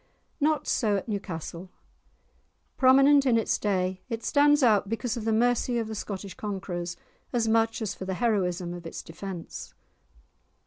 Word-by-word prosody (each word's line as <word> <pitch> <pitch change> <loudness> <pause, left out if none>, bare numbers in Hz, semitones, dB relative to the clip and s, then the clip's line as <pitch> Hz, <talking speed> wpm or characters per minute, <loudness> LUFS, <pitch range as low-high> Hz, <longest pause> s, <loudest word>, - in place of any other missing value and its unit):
Not 305 0 +1
so 210 -5 +2
at 195 - -5
Newcastle. 185 -3 -5 1.1
Prominent 275 +2 +6
in 235 -2 +4
its 225 - 0
day, 185 -2 -1
it 230 -1 -4
stands 290 0 +4
out 210 -4 +4
because 225 +1 -2
of 230 -2 -5
the 225 - +1
mercy 240 +2 +2
of 225 -2 -1
the 220 - -5
Scottish 200 -2 -5
conquerors 185 -4 -4 0.3
as 235 -3 +1
much 225 0 +2
as 205 - -2
for 190 - -7
the 190 0 -2
heroism 180 -6 0
of 175 -1 -8
its - - -7
defence. 175 0 -8
215 Hz, 160 wpm, -27 LUFS, 185-240 Hz, 1.1 s, Prominent